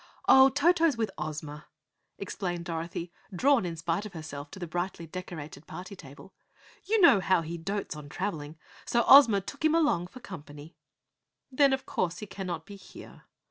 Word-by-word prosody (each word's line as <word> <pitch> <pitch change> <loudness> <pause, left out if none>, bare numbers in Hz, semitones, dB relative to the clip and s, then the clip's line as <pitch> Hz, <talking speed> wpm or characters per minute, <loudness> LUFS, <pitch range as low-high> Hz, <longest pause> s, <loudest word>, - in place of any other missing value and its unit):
"Oh, 265 0 +8
Toto's 320 0 +3
with 225 -2 -1
Ozma," 150 0 -6 0.5
explained 180 -3 -4
Dorothy, 170 0 -5 0.2
drawn 240 +2 +2
in 170 - -5
spite 165 +4 -2
of 210 -3 -9
herself 150 -3 -8
to - - -11
the 180 - -5
brightly 175 +1 -4
decorated 160 -4 -8
party 185 +2 -8
table. 140 +3 -14 0.5
"You 440 +2 +2
know 340 - +7
how 185 -2 +2
he 170 +2 -6
dotes 195 +1 -4
on 150 -1 -10
travelling, 155 -3 -4 0.3
so 235 0 +1
Ozma 235 -8 +8
took 280 +10 -9
him 315 +1 +4
along 290 - +2
for 225 +8 -13
company." 150 -6 -11 0.8
"Then 275 +1 +4
of 265 0 -1
course 175 -1 -2
he 210 - -7
cannot 180 -5 -6
be 200 - -11
here?" 190 - -14
180 Hz, 170 wpm, -28 LUFS, 160-230 Hz, 0.8 s, Oh